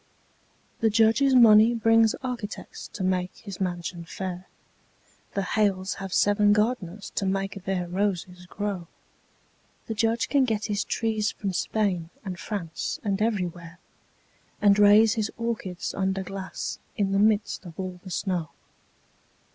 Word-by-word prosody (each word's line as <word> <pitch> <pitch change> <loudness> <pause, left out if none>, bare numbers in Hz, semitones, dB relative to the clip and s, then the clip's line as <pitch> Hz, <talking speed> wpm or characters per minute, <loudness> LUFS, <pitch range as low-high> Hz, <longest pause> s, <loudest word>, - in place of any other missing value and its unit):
The 225 - +3
Judge's 225 +5 +4
money 225 -1 +7
brings 225 0 +4
architects 240 -5 -6
to 190 - -4
make 185 -1 0
his 200 -3 -9
mansion 175 -1 -3
fair; 185 +1 -6 0.9
The 200 - 0
Hales 195 -1 0
have 195 -1 -5
seven 205 +2 +4
gardeners 210 -3 -1
to - - -2
make 195 0 -2
their 185 -2 -1
roses 180 -1 -2
grow; 200 -3 -4 1.0
The 225 - -3
Judge 225 +2 +1
can 280 -2 +3
get 220 -4 0
his 205 -2 -1
trees 220 -2 0
from 195 -2 -4
Spain 185 -4 -1 0.2
and 180 -3 -5
France 175 -7 -4
and 200 -1 -1
everywhere, 180 -6 -2 0.8
And 205 0 +4
raise 210 +2 +7
his 220 -1 -1
orchids 225 -6 -3
under 190 0 -1
glass 195 0 -5 0.2
in 195 -2 +1
the 195 - +2
midst 210 -1 +2
of 165 0 -12
all 185 -1 -5
the 190 - -9
snow. 175 -3 -2
200 Hz, 140 wpm, -26 LUFS, 185-215 Hz, 1.0 s, money